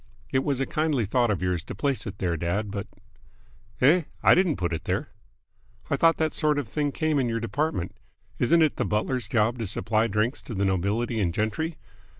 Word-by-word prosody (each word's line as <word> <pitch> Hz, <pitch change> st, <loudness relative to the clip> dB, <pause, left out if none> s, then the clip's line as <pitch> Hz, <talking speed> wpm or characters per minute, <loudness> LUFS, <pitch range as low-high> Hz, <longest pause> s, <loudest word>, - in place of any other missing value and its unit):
It 130 Hz, 0 st, +2 dB
was 140 Hz, -3 st, 0 dB
a 135 Hz, -, +1 dB
kindly 150 Hz, -7 st, 0 dB
thought 120 Hz, +3 st, +2 dB
of 100 Hz, -3 st, -1 dB
yours 90 Hz, -3 st, 0 dB
to -, -, -7 dB
place 140 Hz, -5 st, -1 dB
it 100 Hz, 0 st, -6 dB
there, 85 Hz, -3 st, -1 dB
dad, 90 Hz, +6 st, -2 dB
but 100 Hz, -1 st, -4 dB, 0.5 s
" 115 Hz, -, -30 dB
"Eh? 155 Hz, +6 st, +5 dB, 0.2 s
I -, -, +7 dB
didn't 180 Hz, -5 st, +3 dB
put 85 Hz, -2 st, -1 dB
it 80 Hz, +1 st, -4 dB
there." 95 Hz, +2 st, -1 dB, 0.8 s
"I -, -, +4 dB
thought 165 Hz, 0 st, +4 dB
that 160 Hz, -1 st, 0 dB
sort 150 Hz, -2 st, +1 dB
of 145 Hz, -5 st, -2 dB
thing 145 Hz, +5 st, -1 dB
came 155 Hz, 0 st, 0 dB
in 125 Hz, -3 st, +1 dB
your 115 Hz, 0 st, -1 dB
department. 115 Hz, -, -2 dB, 0.4 s
Isn't 165 Hz, 0 st, +4 dB
it 155 Hz, -, +1 dB
the -, -, +1 dB
butler's 110 Hz, +2 st, -1 dB
job 115 Hz, +2 st, +1 dB
to 115 Hz, -, -2 dB
supply 110 Hz, +3 st, +1 dB
drinks 110 Hz, +4 st, 0 dB
to 115 Hz, -, -7 dB
the 100 Hz, +1 st, +1 dB
nobility 105 Hz, +5 st, 0 dB
and 90 Hz, -5 st, +1 dB
gentry? 110 Hz, -, -2 dB
115 Hz, 210 wpm, -26 LUFS, 100-145 Hz, 0.8 s, I